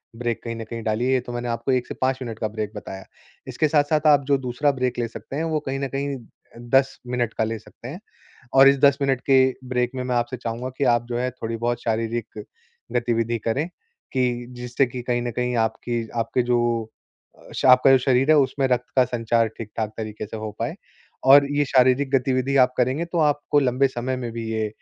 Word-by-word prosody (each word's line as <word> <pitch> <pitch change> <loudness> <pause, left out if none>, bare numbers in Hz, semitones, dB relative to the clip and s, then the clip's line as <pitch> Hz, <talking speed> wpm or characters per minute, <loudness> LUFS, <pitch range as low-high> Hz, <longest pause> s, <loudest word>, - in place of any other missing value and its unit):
Break 120 -1 -3
कहीं 115 -1 -4
न 115 - -6
कहीं 115 0 -6
डालिए, 125 +4 +1
तो 120 0 -8
मैंने 120 0 -4
आपको 115 +3 -1
1 125 -1 0
से - - -5
5 130 0 +1
मिनट 115 -3 -6
का 110 - 0
ब्रेक 105 -1 -4
बताया। 95 -2 -8 0.4
इसके 155 - 0
साथ-साथ 150 +1 +2
आप 145 -2 +5
जो 140 0 +3
दूसरा 130 +3 0
ब्रेक 125 -2 -2
ले 115 - 0
सकते 135 - -9
हैं, 160 - -1
वो 160 -2 0
कहीं 135 0 -2
न 140 - -2
कहीं 140 0 -2 0.5
10 135 +1 +2
मिनट 120 -2 -1
का - - 0
ले 110 0 -2
सकते 115 - -13
हैं 160 +8 -7 0.5
और 135 0 +8
इस 140 - +5
10 140 0 +5
मिनट 135 -2 +1
के 135 - +6 0.3
ब्रेक 125 0 0
में 130 - -3
मैं 125 -1 -1
आपसे 120 +1 -1
चाहूँगा 120 +2 -4
कि 140 - 0
आप 120 0 -3
जो 120 - -2
है, 125 +1 0
थोड़ी-बहुत 120 0 -3
शारीरिक 115 0 -3 0.5
गतिविधि 115 -1 0
करें, 140 +9 0 0.5
कि 125 -2 0
जिससे 125 +2 0
कि 125 0 -6
कहीं 120 0 -1
न 120 0 -3
कहीं 125 +1 -2
आपकी 115 +1 -1
आपके 115 +2 0
जो 120 -2 0 0.7
स - - -2
आपका 130 +1 +7
जो 135 - +7
शरीर 130 +2 +2
है, - - +7
उसमें 135 -1 +2
रक्त 125 -1 -1
का 130 - +6
संचार 115 -1 +1
ठीक-ठाक 110 -1 -4
तरीके 110 -1 -5
से 110 +1 -7
हो 110 0 -5
पाए। - - -2 0.5
और 140 +1 +8
ये 145 - +2
शारीरिक 130 +1 +3
गतिविधि 130 +1 0
आप 125 0 +4
करेंगे 130 +7 +1
तो 170 0 -4
आपको 145 -1 +2
लंबे 135 0 +2
समय 130 +1 -3
में 120 -2 -5
भी 115 0 -5
ये 110 -1 -1
125 Hz, 215 wpm, -23 LUFS, 115-135 Hz, 0.7 s, और